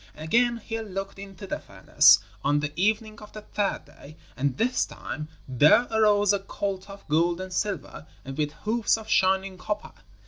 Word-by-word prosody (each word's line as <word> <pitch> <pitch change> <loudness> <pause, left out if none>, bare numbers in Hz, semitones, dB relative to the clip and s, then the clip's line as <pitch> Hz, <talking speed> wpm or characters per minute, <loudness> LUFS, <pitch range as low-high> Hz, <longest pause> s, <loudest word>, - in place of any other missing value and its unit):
Again 235 +10 +2
he 225 0 -5
looked 195 -2 -6
into 195 -1 -9
the - - -4
furnace, - - +5 0.3
on 145 +1 +2
the 150 0 -3
evening 215 +4 0
of 210 - -13
the 215 - -9
third 205 -1 -2
day, 155 +3 -15 0.2
and 135 -1 -1
this 250 +2 +1
time 150 - -7 0.2
there 145 - +5
arose 205 -2 +4
a 200 - +1
colt 195 0 -5
of 200 0 -12
gold 170 +3 +2
and 185 0 -6
silver 190 -5 -3 0.2
and 135 0 -6
with 150 0 -1
hoofs 220 +8 0
of 220 -1 -10
shining 190 -1 +1
copper. 210 +3 -4
195 Hz, 175 wpm, -26 LUFS, 160-215 Hz, 0.3 s, furnace